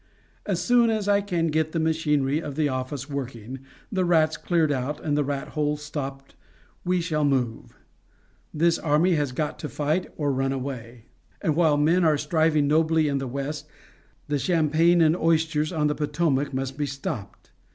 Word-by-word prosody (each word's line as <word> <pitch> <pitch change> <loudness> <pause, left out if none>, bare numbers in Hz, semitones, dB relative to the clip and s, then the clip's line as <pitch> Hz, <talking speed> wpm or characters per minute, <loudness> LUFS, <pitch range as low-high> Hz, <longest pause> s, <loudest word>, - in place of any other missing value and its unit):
As - - 0
soon 240 -1 +4
as 215 -2 -1
I 205 0 +4
can 175 -5 -1
get 155 0 0
the 165 - 0
machinery 155 -2 +1
of 145 -4 -6
the 155 0 +1
office 130 0 -4
working, 130 -3 -6 0.3
the 190 -3 +1
rats 160 -3 +3
cleared 165 -4 +1
out, 140 +2 -2
and 145 -2 +1
the 150 - +2
rat 140 0 -3
holes 150 -1 -1
stopped 135 -2 -6 0.5
we 180 0 +1
shall 160 -3 -1
move. 130 -5 -1 0.7
This 165 +2 +2
army 160 +4 +2
has 145 -4 0
got 150 +4 -3
to 150 - -5
fight 155 +5 -1
or 145 -2 0
run 135 +1 0
away; 125 -3 -6 0.3
and 155 - 0
while 160 -3 +3
men 165 +5 +3
are 155 -2 +4
striving 155 -1 +2
nobly 160 +1 +3
in 140 -1 0
the 135 - -4
West, 140 +4 -4 0.6
the 145 -1 0
champagne 165 +1 +3
and 160 0 +4
oysters 160 -2 +1
on 155 -4 0
the 150 - +2
Potomac 150 -2 0
must 135 +1 -4
be 145 - 0
stopped. 130 -7 -6
150 Hz, 175 wpm, -25 LUFS, 140-160 Hz, 0.7 s, soon